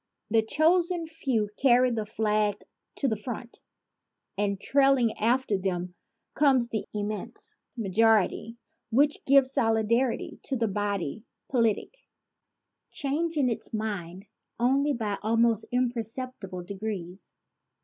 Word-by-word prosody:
The 225 0 +5
chosen 335 +7 +2
few 265 -9 -1
carry 250 -1 +5
the 220 -2 -2
flag 210 -1 0 0.3
to 280 - 0
the 220 - +1
front; 235 +2 -7 0.7
and 200 -1 -1
trailing 270 -3 +3
after 230 -2 +1
them 180 -1 -2 0.4
comes 270 -4 +3
the 220 -3 -3
immense 210 0 -5 0.2
majority 225 +1 +2 0.3
which 280 +6 +2
gives 270 -1 +5
solidity 230 0 +1
to 275 - -3
the 230 -2 +1
body 205 -2 -2 0.3
politic, 240 - 0 0.9
changing 295 0 0
its 225 - -3
mind 195 -4 -4 0.3
only 275 +4 +2
by 215 -5 -2
almost 230 0 +2
imperceptible 235 -5 -2
degrees. 190 -1 -6
225 Hz, 110 wpm, -27 LUFS, 205-265 Hz, 0.9 s, The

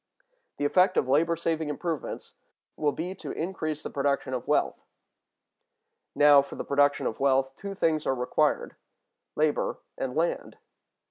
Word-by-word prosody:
The 145 - -1
effect 185 +5 +3
of 130 - +2
labor 160 +5 +3
saving 160 -2 -2
improvements 160 +1 -4 0.4
will 150 -1 +1
be 170 +5 -4
to 190 - -9
increase 155 -3 -3
the - - -6
production 140 -2 -1
of 125 - -4
wealth. - - +1 1.3
Now, 145 0 +7
for 140 - -9
the - - -5
production 145 0 +2
of 110 - -3
wealth, 135 -1 +2
two 200 0 -7
things 160 -4 0
are 135 - +2
required, 125 0 0 0.6
labor 150 -1 0 0.2
and 130 -1 -3
land. 165 +2 -1
150 Hz, 145 wpm, -27 LUFS, 140-165 Hz, 1.3 s, Now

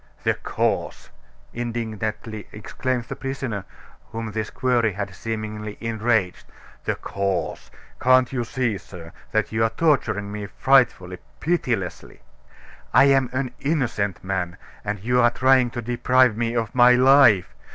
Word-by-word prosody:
"The - - +2
cause!" - - -2 0.4
indignantly 110 -2 -4
exclaimed 125 +4 -3
the - - -7
prisoner, 130 -7 -4 0.5
whom 115 -1 -5
this 110 0 -3
query 120 -4 +1
had 100 -1 -5
seemingly 110 +1 -5
enraged; 110 -4 -1 0.4
"the - - 0
cause! 100 -2 -3 0.3
Can't 130 0 +4
you 125 -2 -1
see, 120 -4 -2
sir, 85 -3 -12 0.2
that 110 - 0
you 110 0 +1
are 115 - +3
torturing 110 -7 0
me 105 -1 -5
frightfully, 100 -8 +2 0.2
pitilessly! 125 - -2 0.7
I - - +6
am 135 -2 +2
an 130 -1 -2
innocent 125 - -1
man, 95 -2 -3 0.3
and 105 0 -3
you 125 +3 +2
are 120 - +6
trying 130 0 +3
to 120 0 -6
deprive 125 0 +3
me 115 +1 -1
of 115 -1 -1
my 125 -1 +6
life. 125 -7 +5
115 Hz, 135 wpm, -23 LUFS, 105-125 Hz, 0.7 s, I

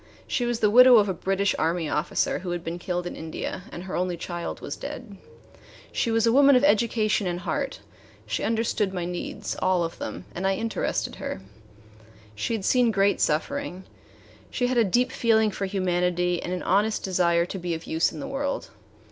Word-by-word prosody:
She 245 - -1
was 240 -1 -2
the 210 -1 +4
widow 250 +1 +9
of 205 -1 +4
a - - 0
British 195 +3 0
Army 165 0 0
officer 150 +3 0
who 180 - -6
had 175 -1 -3
been 170 +2 -4
killed 180 0 -3
in - - -5
India, 160 +3 -5
and 175 - -7
her 190 - -5
only 180 -1 -1
child 175 0 -5
was - - -5
dead. 205 -4 -8 0.8
She 235 - 0
was 225 0 +2
a 230 - +4
woman 280 +1 +7
of 250 - +4
education 215 -4 +2
and 175 0 -3
heart; 275 +8 -3 0.4
she - - -2
understood 220 -3 0
my 175 -1 -2
needs, 175 0 -4
all 185 -2 +2
of 165 - -5
them, 90 -4 -6
and 190 +2 -2
I 195 - +2
interested 225 +2 -2
her. - - -5 0.9
She 105 - -2
had 200 -4 -4
seen 250 -2 +4
great 200 -1 +2
suffering; 190 - -1 0.7
she 250 - -1
had 250 0 0
a - - +6
deep 245 +6 +1
feeling 220 -3 +3
for 195 0 -3
humanity 180 -2 0
and 175 - -5
an 180 - -3
honest 210 +4 +1
desire 170 -2 +2
to 190 - -6
be 175 -1 -2
of 160 - -8
use 160 +1 +1
in 155 - -8
the - - -5
world. 275 +1 -3
190 Hz, 200 wpm, -25 LUFS, 175-225 Hz, 0.9 s, widow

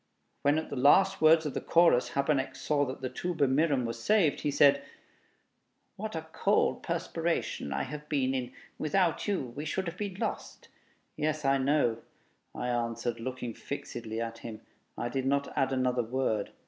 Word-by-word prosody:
When, 145 +2 +3
at 160 - -3
the - - -3
last 190 +9 +4
words 160 0 +6
of 145 - -3
the - - -3
chorus, 170 -7 +3
Habeneck 140 -1 +1
saw 145 +1 0
that 130 - -6
the 130 - -2
'Tuba 155 +2 0
mirum' 140 -1 +2
was 115 0 -5
saved, 205 -9 +3
he 150 - 0
said, 140 0 +5 1.1
"What - - -5
a - - -4
cold - - +1
perspiration 70 - -2
I - - -1
have 150 0 -8
been 135 -3 +1
in! 125 -2 -3 0.3
Without 170 +4 +1
you 140 -12 -2
we 145 - -4
should 185 +5 -2
have 170 +1 -5
been 200 -3 -4
lost." - - -5 0.5
"Yes, 155 -1 -1
I 135 0 +3
know," 130 -4 +2 0.6
I 125 - -3
answered, 115 -1 -2
looking 125 -1 -5
fixedly 115 -3 -6
at 115 0 -4
him. 115 -2 -8 0.4
I - - -2
did 130 +2 -2
not 140 +1 0
add 135 0 +1
another 125 -1 +1
word.... 115 -3 -1
135 Hz, 175 wpm, -30 LUFS, 125-155 Hz, 1.1 s, words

